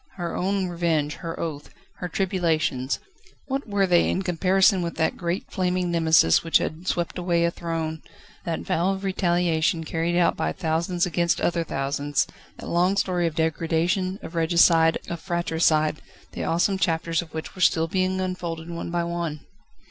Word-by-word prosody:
Her 175 -3 -4
own 195 +1 0
revenge, 165 -4 0
her 165 -2 -6
oath, 150 -3 -5 0.3
her 180 - -4
tribulations, 165 -8 0 0.5
what 275 -1 -3
were 200 -1 +2
they 175 -2 +3
in 190 - -1
comparison 185 +2 +3
with 170 -1 -3
that 160 - 0
great 175 +2 -3
flaming 180 -1 0
Nemesis 160 - +4
which 165 - +4
had 165 +4 -4
swept 175 -1 -1
away 170 -1 +1
a 170 - +1
throne, 165 -2 -4 0.4
that 165 -1 -3
vow 180 +4 0
of 190 0 -6
retaliation 175 -3 +1
carried 165 +2 -1
out 175 -1 +3
by - - -1
thousands 170 +2 0
against 170 -1 +1
other 170 -1 0
thousands, 140 -1 -1 0.3
that - - -9
long 180 +3 +2
story 180 -3 +1
of 160 - -4
degradation, 170 +4 0
of - - -8
regicide, 165 -1 +4
of 170 - -4
fratricide, 160 -3 +1 0.3
the - - -4
awesome 190 +4 +1
chapters 165 -1 0
of 170 - -12
which 160 - -5
were 185 - -9
still 165 -2 +3
being 185 +2 0
unfolded 170 -3 -4
one 170 0 -5
by 170 0 0
one? 170 -3 -3
170 Hz, 165 wpm, -24 LUFS, 160-180 Hz, 0.5 s, Nemesis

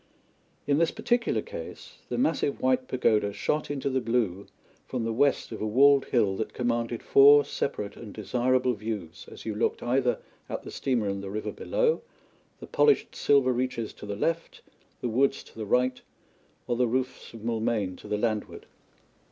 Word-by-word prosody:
In 145 +1 +2
this 165 - +3
particular 240 -1 0
case, - - -9
the - - -2
massive 250 - +1
white 130 0 +1
pagoda 110 -5 +2
shot 150 +8 -1
into 140 -1 -2
the 130 -1 +1
blue 115 -5 -1 0.4
from 125 -3 -3
the 115 0 -1
west 140 +2 +1
of 110 - -6
a 110 - -1
walled 140 +5 +5
hill 105 -6 +2
that 110 - -4
commanded 120 -1 -1
four 145 +1 +7
separate 105 -6 -3
and 110 -3 -9
desirable 125 +4 +1
views 100 -5 -6
as - - -11
you 110 - -2
looked 105 - -1
either 125 0 +1 0.3
at - - -4
the - - -8
steamer 120 -6 0
in 100 0 -2
the 100 - -6
river 105 +2 -3
below, 485 -1 0 0.6
the - - -8
polished 435 -2 +2
silver 135 -3 +3
reaches 125 -3 -2
to 105 - -10
the 100 - -3
left, 165 +10 -2 0.4
the - - -1
woods 135 +4 +1
to - - -19
the 110 -2 -5
right, 125 +3 +1 0.6
or 120 - -1
the 125 0 +2
roofs 130 +2 -2
of 115 - -10
Moulmein 110 -4 -1
to - - -12
the 105 - -1
landward. 110 -1 -2
120 Hz, 175 wpm, -27 LUFS, 110-135 Hz, 0.6 s, four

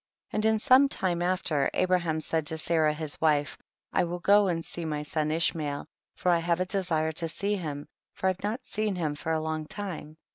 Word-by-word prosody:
22. - - -7
And 220 - +4
in - - +1
some 265 +4 +5
time 175 -8 0
after, 175 -6 +1
Abra 185 0 +3
ham 160 -2 -2
said 160 -1 -1
to 160 - 0
Sarah 160 -1 +2
his 155 -1 -4
wife, 150 -2 +2 0.4
I - - +3
will 175 0 -3
go 200 +3 +5
and 165 -2 -1
see 170 - -5
my 150 -2 -2
son 150 0 -1
Ishmael, 155 -3 -1 0.3
for 180 - +1
I 170 - +4
have 170 +1 0
a 185 - +1
desire 175 -5 0
to 165 +1 -2
see 200 +5 -1
him, 150 -6 -5 0.3
for - - -5
I - - +5
have 185 0 -8
not 230 +5 -2
seen 215 -2 -1
him 160 -4 -1
for 155 +2 -4
a 160 - +1
long 155 0 -3
time. 165 -6 -6
165 Hz, 225 wpm, -28 LUFS, 155-185 Hz, 0.4 s, some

